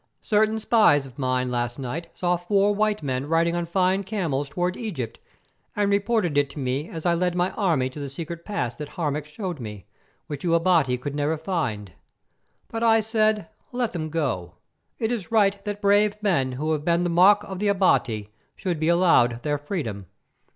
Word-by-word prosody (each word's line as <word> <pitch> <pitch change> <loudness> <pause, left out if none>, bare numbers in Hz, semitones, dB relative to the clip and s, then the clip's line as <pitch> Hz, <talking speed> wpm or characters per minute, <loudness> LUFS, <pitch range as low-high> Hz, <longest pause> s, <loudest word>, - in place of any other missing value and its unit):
"Certain 215 0 +2
spies 215 - +4
of 130 0 -13
mine 130 -1 0
last 120 0 -2
night 145 +6 -5
saw 180 -1 +1
four 195 +3 +2
white 210 -2 0
men 130 0 -2
riding 165 +2 +2
on 175 -1 -2
fine 185 +2 +1
camels 165 -9 -2
towards 180 +5 -1
Egypt, 160 - -5 0.6
and 205 -1 +1
reported 200 -6 +2
it 145 -1 +1
to - - -13
me 135 +3 -2
as 160 0 -7
I 175 - +4
led 175 +1 0
my 180 +1 +1
army 165 -11 +1
to 150 - -9
the 140 -1 -5
secret 165 +4 -7
pass 145 - -2
that 150 -1 -6
Harmac 150 -3 -2
showed 175 0 -5
me, 105 -5 -8 0.4
which 145 -2 -6
you 170 -2 +2
Abati 165 -7 +3
could 140 +3 -5
never 145 +2 0
find. 140 - -3 0.8
But 225 - -5
I 225 -1 +5
said, 215 -3 +1 0.2
'Let 245 -2 -1
them 155 -3 -3
go; 125 - -2 0.4
it 225 +1 -1
is 225 -3 -4
right 200 -3 +3
that 205 0 -4
brave 205 +1 +4
men 135 -11 +1
who 150 +5 -2
have 150 -2 -1
been 170 +1 +2
the 175 - 0
mock 195 +4 +6
of 190 -2 -7
the 210 - 0
Abati 125 - +1 0.2
should 180 -6 -3
be 160 - 0
allowed 145 -10 +3
their 145 -1 0
freedom. 125 - -4
170 Hz, 190 wpm, -24 LUFS, 140-200 Hz, 0.8 s, mock